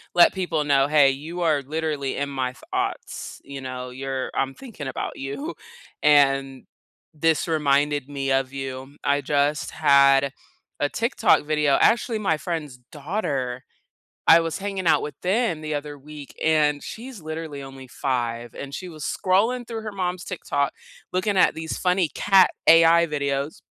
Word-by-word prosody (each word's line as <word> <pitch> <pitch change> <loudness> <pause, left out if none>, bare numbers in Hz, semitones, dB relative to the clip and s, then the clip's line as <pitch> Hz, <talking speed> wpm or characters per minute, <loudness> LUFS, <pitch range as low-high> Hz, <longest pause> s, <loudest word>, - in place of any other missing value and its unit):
let 175 - +7
people 175 -5 -1
know, 140 -1 +3
"Hey, 145 -2 +5
you 160 +6 -6
are 155 -4 +2
literally 150 -1 -3
in 140 0 -2
my 130 -2 -2
thoughts," - - -5
you 140 -1 -8
know? 130 -1 -6
"You're 130 0 -4
I'm 135 0 -1
thinking 210 - -9
about - - -4
you, 210 - -5 0.5
and 135 -3 +3 0.5
this 160 +2 +1
reminded 145 -2 +1
me 140 -1 -3
of 135 0 0
you." 135 0 -6
I 140 0 +2
just 145 +3 0
had 140 -2 +4 0.5
a 145 - +2
TikTok 230 - +2
video 150 -2 +2
actually, 230 -1 +3
my 165 -7 +1
friend's 155 -7 -4
daughter, 140 - -3 0.6
I 165 +1 +8
was 165 +1 -3
hanging 195 -2 -4
out 165 - +4
with 150 - -7
them 190 -3 0
the 155 0 -4
other 145 0 -5
week, 145 0 -11
and 150 -2 +2
she's 245 0 -8
literally 155 -3 -6
only 135 -1 -11
5, 120 -2 -3
and 140 0 -7
she 185 - -6
was 155 -3 -9
scrolling 225 - +1
through 225 -2 -5
her 215 -1 -6
mom's 180 -2 -3
TikTok, 140 -6 -2 0.4
looking 185 +3 0
at - - +4
these 160 0 -5
funny 180 -3 +2
cat 195 -2 +4 0.2
AI 165 +1 +7
videos, 140 -1 -2
150 Hz, 155 wpm, -24 LUFS, 135-170 Hz, 0.6 s, I